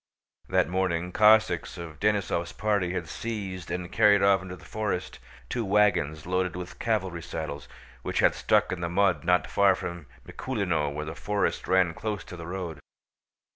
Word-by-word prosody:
That - - +3
morning, 90 -1 -1
Cossacks 110 0 +4
of 85 -3 -8
Denísov's 95 -5 0
party 100 -5 0
had 90 -3 -3
seized 95 -6 -5
and 90 0 -4
carried 105 -3 +5
off 100 -1 +5
into 95 -1 -7
the - - -16
forest 105 -4 -3 0.3
two 120 - -2
wagons 90 -7 +2
loaded 90 -1 0
with 90 0 -7
cavalry 95 -7 -1
saddles, 75 -3 -6 0.3
which - - -4
had - - +4
stuck - - +2
in 90 -2 -3
the 85 - -1
mud 100 +3 +2
not 90 +1 +3
far 100 -1 +3
from 85 -5 -6 0.2
Mikúlino 90 - -1
where 75 +1 -4
the 80 - -5
forest 105 +4 -1
ran 90 -2 +3
close 105 +3 -4
to - - -10
the 85 -1 -8
road. 90 -4 -5
90 Hz, 170 wpm, -27 LUFS, 85-100 Hz, 0.3 s, carried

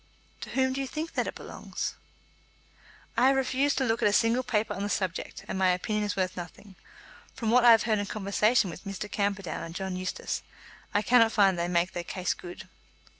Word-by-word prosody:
"To - - -6
whom 260 0 +1
do 270 - -2
you 270 - -3
think 310 +5 -5
that - - 0
it - - -5
belongs?" - - -5 1.2
"I 250 - +5
have 270 - +4
refused 270 +2 +1
to 265 - +2
look 225 -1 0
at - - +4
a - - +3
single 230 +4 +3
paper 215 -3 -1
on 195 - -5
the 205 - -2
subject, 185 -3 -3
and 190 - -3
my 190 -1 +4
opinion 210 +4 0
is 205 - -2
worth 185 -2 -1
nothing. 180 +3 -9 0.6
From 225 -2 -1
what 250 +1 +5
I 240 - +8
have 225 -1 +7
heard 215 -2 +1
in 205 - -2
conversation 210 0 +2
with 165 - -10
Mr. 195 +1 -5
Camperdown 200 -3 -2
and 165 0 -7
John 190 -1 -3
Eustace, 185 0 -3 0.5
I 205 - +1
cannot 230 -2 +5
find 195 -3 +4
that 170 - -2
they 170 - 0
make 175 0 +2
their 175 - -4
case 185 +1 -2
good." 180 +2 -10
205 Hz, 220 wpm, -28 LUFS, 185-235 Hz, 1.2 s, I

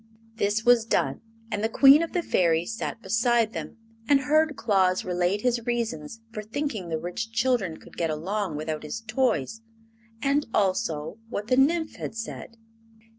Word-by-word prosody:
This 210 +2 0
was 240 -2 +6
done, 225 - 0 0.3
and 210 0 -2
the 220 - +1
Queen 275 +5 +7
of 335 - -2
the 355 - 0
Fairies 170 - +1
sat 225 - -5
beside 225 +2 +2
them 230 - -6 0.3
and 280 -1 +5
heard 310 +2 +2
Claus 190 -6 +2
relate 180 +2 0
his 240 -1 0
reasons 225 -5 -3
for 215 - -5
thinking 220 - -4
the 160 - -1
rich 175 +7 -5
children 225 -7 0
could - - -16
get 165 -1 0
along 180 +3 -2
without 155 0 -3
his 155 +9 -5
toys, 225 - -1 0.6
and 280 +4 +1
also 185 -2 0
what 210 -1 -4
the 255 - +4
Nymph 320 +4 +2
had - - -6
said. 225 0 -7
220 Hz, 165 wpm, -26 LUFS, 180-245 Hz, 0.6 s, Queen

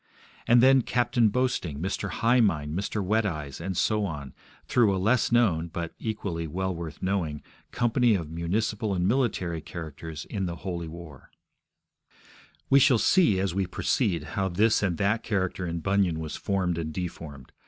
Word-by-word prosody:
And 120 +1 +6
then 135 0 +6
Captain 120 -2 +2
Boasting, 105 - -1
Mr. 95 +3 -2
High 115 +7 +2
mind, 80 -9 +1
Mr. 100 +2 -2
Wet 110 +4 +2
Eyes, 75 -7 -4
and 95 0 -3
so 105 -1 +1
on, 75 -7 -5 0.3
through 110 -6 +3
a - - -1
less 110 +7 +2
known 95 -9 +3
(but 85 0 -5
equally 100 -7 -3
well 95 +4 -2
worth 80 -3 -7
knowing) 90 -6 -1 0.3
company 120 -1 +2
of 85 -5 -3
municipal 100 +5 -1
and 90 0 +1
military 100 -9 0
characters 80 -1 -7
in 95 -3 -3
the 85 - -4
Holy 85 -3 -3
War. 80 -4 -11 1.4
We 140 - +6
shall 135 -3 +5
see, 155 - +4
as 95 -2 -1
we 95 -1 -1
proceed, 90 - 0
how 95 -2 0
this 105 +5 +2
and 90 -5 0
that 105 +3 +1
character 95 -3 -2
in 85 0 -3
Bunyan 95 -3 +1
was 80 -1 -5
formed 95 -4 -1
and 80 -1 -3
deformed. 75 -6 -7
95 Hz, 165 wpm, -27 LUFS, 85-110 Hz, 1.4 s, And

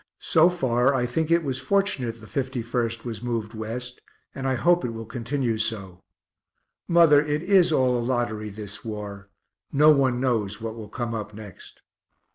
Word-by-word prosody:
So 165 +2 +4
far 130 -5 +1
I 125 -2 +1
think 155 +6 -1
it 170 0 +3
was 135 -3 -2
fortunate 135 - 0
the - - -11
51st 120 -1 -2
was 115 -3 -5
moved 115 -3 -3
West, 120 +3 -6 0.3
and 135 0 -4
I 130 - +1
hope 175 +7 +3
it 125 - -1
will 115 0 -6
continue 120 -1 -2
so. 100 -5 -3 0.9
Mother, 165 -4 +6
it 150 +1 -2
is 180 -2 +4
all 130 -4 +2
a - - -1
lottery, 115 -3 -2
this 105 0 -8
war; 105 -2 -7 0.4
no 150 +2 +6
one 135 -4 +2
knows 110 -6 -1
what 115 -1 -5
will 110 -3 -9
come 120 0 -4
up 105 -2 -5
next. 105 -4 -12
120 Hz, 170 wpm, -25 LUFS, 110-140 Hz, 0.9 s, Mother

